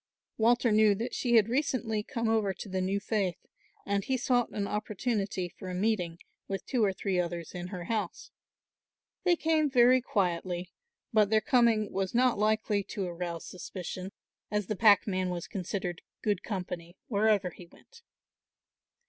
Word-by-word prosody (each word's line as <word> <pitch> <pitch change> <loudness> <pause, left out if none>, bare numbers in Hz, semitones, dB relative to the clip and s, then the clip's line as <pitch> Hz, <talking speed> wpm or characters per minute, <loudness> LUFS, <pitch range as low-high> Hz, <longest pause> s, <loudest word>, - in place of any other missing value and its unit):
Walter 235 +1 +4
knew 210 -1 +5
that 230 +5 -4
she 240 -2 +1
had 220 -2 +6
recently 240 -4 0
come 230 +2 -3
over 215 -4 +1
to - - -8
the 190 -1 -2
new 195 +2 0
faith 200 -4 -1 0.5
and 200 0 0
he 260 +4 0
sought 245 -1 +1
an 200 -1 -3
opportunity 210 -3 -2
for 185 +2 -9
a 180 - -4
meeting 180 -4 0 0.3
with 195 -1 -4
two 250 -4 +1
or 200 - +3
three 190 -1 -1
others 170 -2 -3
in 180 0 -5
her 180 -2 -6
house. 210 -1 -3 0.9
They 355 -1 +5
came 315 -2 +2
very 255 0 +5
quietly, 180 -4 -1 0.4
but 210 -2 +4
their 220 0 +4
coming 235 -5 +3
was 195 +2 -2
not 250 -3 +3
likely 215 -1 +2
to 195 - -4
arouse 170 -1 -4
suspicion, 185 +1 -6 0.4
as 210 -1 0
the 215 - -2
packman 200 -3 +4
was 175 -1 -3
considered 180 -2 -4 0.2
good 205 -4 +1
company 180 -4 -5
wherever 205 -4 +2
he 175 +1 -13
went. 470 - -19
205 Hz, 160 wpm, -30 LUFS, 185-225 Hz, 0.9 s, had